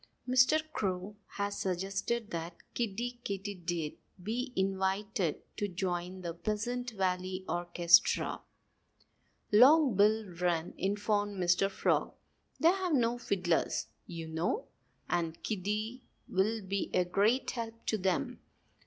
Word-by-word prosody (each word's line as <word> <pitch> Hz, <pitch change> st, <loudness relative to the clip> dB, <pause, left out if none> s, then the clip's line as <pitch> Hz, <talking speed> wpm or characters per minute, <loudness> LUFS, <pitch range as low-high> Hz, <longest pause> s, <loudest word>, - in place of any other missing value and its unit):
"Mr. 255 Hz, +5 st, +5 dB
Crow 190 Hz, +1 st, -2 dB, 0.2 s
has 200 Hz, 0 st, -2 dB
suggested 195 Hz, +5 st, -2 dB
that 170 Hz, 0 st, -4 dB, 0.2 s
Kiddie 240 Hz, +2 st, -2 dB
Katydid 180 Hz, -5 st, -3 dB, 0.3 s
be 245 Hz, +6 st, -2 dB
invited 190 Hz, -2 st, 0 dB
to 205 Hz, -, 0 dB
join 180 Hz, 0 st, -3 dB
the 170 Hz, -2 st, -4 dB
Pleasant 225 Hz, +7 st, -2 dB
Valley 185 Hz, -2 st, -2 dB
orchestra," 175 Hz, 0 st, +3 dB, 1.1 s
Long 260 Hz, +3 st, +7 dB
Bill 215 Hz, +2 st, +4 dB
Wren 175 Hz, -2 st, -1 dB
informed 205 Hz, +1 st, 0 dB
Mr. 180 Hz, +2 st, +3 dB
Frog. -, -, 0 dB, 0.4 s
"They 325 Hz, -, +6 dB
have 370 Hz, -2 st, +1 dB
no 240 Hz, -1 st, +2 dB
fiddlers, 180 Hz, -7 st, 0 dB, 0.2 s
you 165 Hz, -2 st, -6 dB
know. 165 Hz, -, -2 dB, 0.4 s
And 165 Hz, -2 st, -1 dB
Kiddie 215 Hz, +4 st, -2 dB, 0.3 s
will 215 Hz, +3 st, +1 dB
be 195 Hz, +1 st, -2 dB
a 180 Hz, -, +3 dB
great 210 Hz, +8 st, +2 dB
help 230 Hz, -1 st, -6 dB
to 220 Hz, -, 0 dB
them. 195 Hz, +8 st, 0 dB
195 Hz, 115 wpm, -32 LUFS, 180-225 Hz, 1.1 s, Long